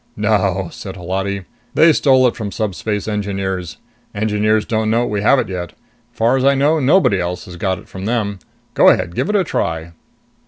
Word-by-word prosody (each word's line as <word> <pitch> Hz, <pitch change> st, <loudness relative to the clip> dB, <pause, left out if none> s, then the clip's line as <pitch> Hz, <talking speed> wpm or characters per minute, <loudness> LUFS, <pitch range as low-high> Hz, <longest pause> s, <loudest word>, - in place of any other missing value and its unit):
"No," 100 Hz, -3 st, +1 dB
said 95 Hz, -1 st, -8 dB
Holati. 95 Hz, +2 st, -3 dB, 0.3 s
"They 160 Hz, +1 st, +6 dB
stole 130 Hz, -3 st, +4 dB
it 120 Hz, -, -1 dB
from 105 Hz, -3 st, -5 dB
Subspace 105 Hz, 0 st, -3 dB
Engineers. 95 Hz, -4 st, -3 dB, 0.4 s
Engineers 105 Hz, 0 st, +1 dB
don't 110 Hz, -1 st, -1 dB
know 115 Hz, +2 st, +2 dB
we 105 Hz, -3 st, -2 dB
have 140 Hz, +6 st, +4 dB
it -, -, 0 dB
yet. 90 Hz, -2 st, -5 dB, 0.4 s
Far 120 Hz, +1 st, +1 dB
as 130 Hz, -, 0 dB
I 140 Hz, +1 st, +4 dB
know, 150 Hz, +4 st, +2 dB
nobody 140 Hz, -, +3 dB
else 90 Hz, 0 st, -3 dB
has 90 Hz, -, -10 dB
got 95 Hz, +2 st, -1 dB
it -, -, -14 dB
from 95 Hz, 0 st, -8 dB
them. 105 Hz, -4 st, -1 dB, 0.3 s
Go -, -, +6 dB
ahead 85 Hz, -, +1 dB
give -, -, -2 dB
it 210 Hz, -, 0 dB
a 195 Hz, -, +3 dB
try." 80 Hz, -, -3 dB
105 Hz, 190 wpm, -18 LUFS, 95-120 Hz, 0.4 s, They